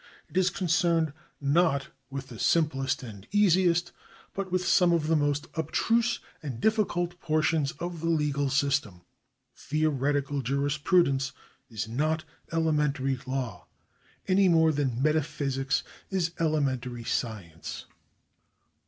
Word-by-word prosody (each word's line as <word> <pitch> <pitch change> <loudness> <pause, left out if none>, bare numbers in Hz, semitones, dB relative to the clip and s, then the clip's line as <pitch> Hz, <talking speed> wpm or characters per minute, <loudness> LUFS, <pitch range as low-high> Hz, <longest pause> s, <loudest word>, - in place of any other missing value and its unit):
It - - -18
is 185 -1 +4
concerned 170 -4 +1 0.3
not 140 -1 +2 0.2
with 135 -1 -6
the 115 - -10
simplest 135 -5 +1
and 105 -3 -10
easiest, 175 -3 +3 0.4
but 195 -2 -4
with 180 0 0
some 180 -1 +4
of 165 -3 +1
the 160 +1 +2
most 145 -1 +1
abstruse 230 - +1 0.2
and 135 -6 -5
difficult 175 - 0
portions 155 -2 +1
of 175 -1 -5
the 165 +1 -1
legal 145 -3 +1
system. 135 -9 0 0.5
Theo 155 +2 0
retical 140 0 0
jurisprudence 140 +1 +1 0.4
is 110 -2 -4
not 155 +7 0 0.3
elementary 150 -5 +1
law, 130 -6 -4 0.6
any 190 0 +4
more 160 -1 +5
than 135 -4 -1
metaphysics 140 -3 0 0.3
is 180 -4 0
elementary 130 -7 0
science. 105 -9 -4
150 Hz, 120 wpm, -28 LUFS, 135-170 Hz, 0.6 s, more